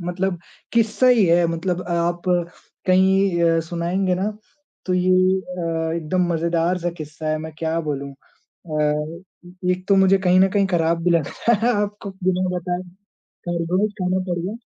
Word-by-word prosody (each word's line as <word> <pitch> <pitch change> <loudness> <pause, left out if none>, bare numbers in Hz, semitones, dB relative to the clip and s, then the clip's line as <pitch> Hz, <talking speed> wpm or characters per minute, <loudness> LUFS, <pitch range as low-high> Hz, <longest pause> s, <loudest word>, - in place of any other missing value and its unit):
मतलब 180 0 -1 0.3
किस्सा 230 +2 +2
ही 240 -5 +5
है। 170 0 +4
मतलब 175 +2 -2
आप 170 0 0 0.6
कहीं 190 -1 +3
अ, 165 -1 +3
सुनाएँगे 180 +2 0
ना 195 +4 -1 0.6
तो 185 - +1
ये 180 0 +2 0.3
अ, 165 -3 -3
एकदम 170 +2 0
मज़ेदार 170 +2 0
सा 175 0 -2
किस्सा 155 +1 -6
है, 155 0 0
मैं 160 0 -7
क्या 160 0 -1
बोलूँ? 140 -1 -3 0.4
अ, 155 +1 -3 0.5
एक 180 0 -1
तो 200 - +5
मुझे 190 0 +5
कहीं 185 -1 +3
न 190 - +5
कहीं 200 0 +2
खराब 165 -2 +1
भी 180 - +3
लग 165 -4 +2
रहा 235 - 0
है, 245 - +3
आपको 205 -1 -5
बिना 185 0 +1
बताए 175 +1 -3 0.7
खरगोश 175 +4 0
खाना 185 +1 +1
पड़ 175 - -1
गया। 195 +7 -4
175 Hz, 165 wpm, -21 LUFS, 165-190 Hz, 0.7 s, ही